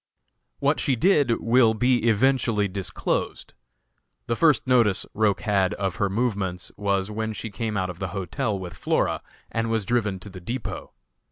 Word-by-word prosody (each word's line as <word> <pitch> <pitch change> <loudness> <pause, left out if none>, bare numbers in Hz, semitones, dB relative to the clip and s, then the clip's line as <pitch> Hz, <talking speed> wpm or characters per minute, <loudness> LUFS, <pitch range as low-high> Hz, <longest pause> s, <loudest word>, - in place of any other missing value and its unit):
What - - +1
she 135 - +1
did 140 - +3
will 115 -1 +4
be 120 0 +2
eventually 115 -2 +2
disclosed. 95 0 -3 0.7
The 115 - -1
first 155 0 +3
notice 115 -7 +3
Roch 105 -2 +1
had 100 -4 +1
of 95 -2 -2
her 100 - +1
movements, 100 -5 -2
was 100 -1 -1
when 110 +1 -3
she 110 +1 -6
came 110 0 -3
out 95 -1 -1
of 90 - -13
the 95 - -2
hotel 95 +3 -2
with 90 -3 -7
Flora, - - 0 0.3
and 115 0 -1
was 110 -3 0
driven 110 -4 0
to 100 - -7
the 95 -1 -10
depot. 120 +9 -5
105 Hz, 165 wpm, -25 LUFS, 95-120 Hz, 0.7 s, will